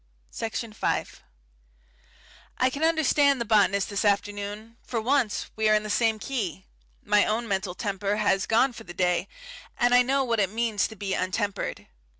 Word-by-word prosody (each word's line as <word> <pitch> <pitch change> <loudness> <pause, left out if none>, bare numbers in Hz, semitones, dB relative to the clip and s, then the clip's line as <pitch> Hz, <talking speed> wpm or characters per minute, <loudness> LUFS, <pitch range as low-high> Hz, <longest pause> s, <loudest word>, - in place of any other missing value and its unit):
Section 225 0 -4
5 - - -2 1.4
I 255 - +3
can 285 +4 -4
understand 295 -4 +3
the 235 - -2
botanist 200 -2 +2
this 200 - -1
afternoon; 205 +2 -2
for 235 - -3
once 245 -1 0
we 220 0 +2
are 215 - +5
in 210 - +1
the 215 - -4
same 225 0 +2
key. 200 - -4 0.4
My 205 0 +4
own 230 +2 -1
mental 190 -3 -2
temper 200 0 -2
has 205 -2 +1
gone 245 +4 +3
for - - -10
the 175 0 -11
day, 180 -1 +1 0.5
and 245 0 +3
I 245 - +7
know 270 +2 +1
what 235 -3 0
it 195 -3 +2
means 220 -1 0
to 220 - -11
be 200 -2 -3
untempered. 195 +3 -2
215 Hz, 170 wpm, -26 LUFS, 200-235 Hz, 1.4 s, I